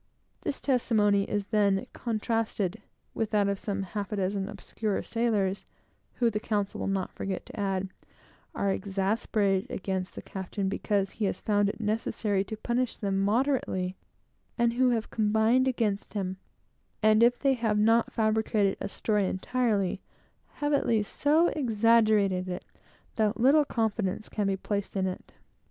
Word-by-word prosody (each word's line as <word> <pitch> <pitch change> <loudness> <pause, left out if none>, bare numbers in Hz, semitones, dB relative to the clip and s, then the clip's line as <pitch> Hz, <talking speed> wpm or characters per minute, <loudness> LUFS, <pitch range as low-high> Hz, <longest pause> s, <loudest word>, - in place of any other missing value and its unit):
This 285 - -3
testimony 210 -6 +2
is 205 -1 -1
then 200 -2 +3
contrasted 220 -3 -1 0.3
with 225 -2 -1
that 205 -2 +2
of 200 -1 -1
some 200 -2 -3
half 200 +1 -4
dozen 195 -1 -1
obscure 215 -3 -3
sailors, 210 -5 0 0.5
who, 235 -2 +1
the 210 - -1
counsel 205 -2 -2
will - - -2
not 195 -1 -1
forget 190 -1 -4
to - - -10
add, 195 -1 -1 0.7
are 200 - +1
exasperated 195 0 0
against 190 -1 -3
the - - -7
captain 190 +1 -4
because 200 -1 0
he 220 - -2
has 195 - -1
found 205 -1 +2
it - - -6
necessary 210 -2 0
to 220 - -6
punish 240 +2 -1
them 195 -2 -1
moderately, 205 -4 0 0.6
and 235 0 +2
who 255 +1 +3
have 230 -2 -1
combined 220 +4 +3
against 220 -5 -1
him, 190 -2 -2 0.7
and 215 +1 +5
if 240 +1 +5
they 275 -1 +2
have 225 -4 0
not 225 +2 +3
fabricated 215 -2 +1
a - - -3
story 210 -1 0
entirely, 200 -2 0 0.5
have 290 0 -1
at 285 - +2
least 215 -3 0
so 315 +4 +4
exaggerated 215 -7 +3
it, 180 - -5 0.5
that 220 +1 +1
little 285 +5 +5
confidence 220 -4 -1
can 210 -2 -1
be 195 -1 0
placed 200 +1 -3
in 190 -1 +1
it. 185 -1 -5
210 Hz, 150 wpm, -28 LUFS, 195-230 Hz, 0.7 s, and